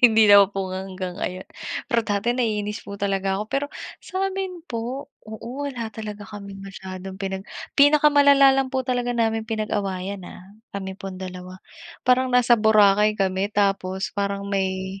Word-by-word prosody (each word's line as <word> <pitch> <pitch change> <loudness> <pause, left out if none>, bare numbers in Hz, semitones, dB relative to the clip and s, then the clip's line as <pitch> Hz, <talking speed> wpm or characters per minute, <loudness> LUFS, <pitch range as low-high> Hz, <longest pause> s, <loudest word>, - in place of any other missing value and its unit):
Hindi 220 -2 +6
na 200 0 +9
po 195 -1 -4
hanggang 185 -1 -5
ngayon. 185 -1 -5 0.4
Pero 235 - +2
dati 210 +3 0
naiinis 210 -3 -1
po 200 - -8
talaga 195 0 0
ako, - - -2
pero 275 +1 -1 0.4
sa'min 380 -1 -3
po 240 +4 -4 0.2
oo, 235 +6 -6
wala 245 -5 -4
talaga 210 -1 -8
kaming 200 -2 -9
masyadong 190 -1 -8
pinag 195 0 -5 0.2
pinakamalala 285 -1 +6
lang 270 -1 +1
po 260 -1 -2
talaga 245 -1 -1
naming 225 -1 0
pinag-awayan, 200 -3 -2
ah, - - -12 0.3
kami 190 -1 -4
pong 195 -1 -8
2. 185 0 -8 0.5
Parang 255 +1 +3
nasa 250 -1 +4
Boracay 210 -1 +5
kami 195 0 0
tapos 195 -2 0
parang 200 0 -2
may 190 -1 -2
205 Hz, 150 wpm, -23 LUFS, 195-245 Hz, 0.5 s, na